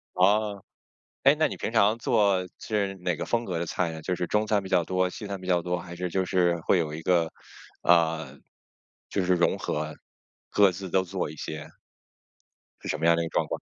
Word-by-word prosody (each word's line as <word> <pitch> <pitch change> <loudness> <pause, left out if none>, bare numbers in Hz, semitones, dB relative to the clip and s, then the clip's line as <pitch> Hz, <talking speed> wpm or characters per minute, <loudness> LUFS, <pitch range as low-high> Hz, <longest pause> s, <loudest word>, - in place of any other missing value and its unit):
哦。 100 +1 +2 0.6
诶， - - +6
那 - - +2
你 - - -6
平 - - -3
常 105 +3 +4
做， 105 -7 +2
就 110 - -5
是 100 -2 0
哪 90 -2 0
个 - - -3
风 120 0 0
格 90 -6 -3
的 85 - -2
菜 85 0 -1
呢？ 80 0 -7
就 90 +3 -1
是 90 - -2
中 105 0 +1
餐 105 -2 +1
比 95 - -8
较 90 -3 +3
多， 90 0 +1
西 105 +2 -7
餐 100 -1 -4
比 90 - -9
较 90 -2 +3
多， 90 +1 -1
还 85 0 -8
是 90 0 -3
就 95 +2 0
是 90 -2 +2
会 95 - +3
有 75 -3 -1
一 80 - -5
个， 85 -1 +2 0.5
呃， 80 -5 +2 0.7
就 95 -3 -1
是 90 - +3
融 85 -1 +2
合， 75 +1 -3 0.6
各 100 -2 +5
自 95 +1 -7
都 95 +2 +2
做 95 -2 -3
一 75 - -9
些？ 80 -1 -6 1.1
是 - - -8
什 - - -1
么 80 - -1
样 85 - +6
的 85 - 0
一 - - -2
个 - - -8
状 - - 0
况？ - - -3
90 Hz, 245 characters per minute, -27 LUFS, 85-100 Hz, 1.1 s, 诶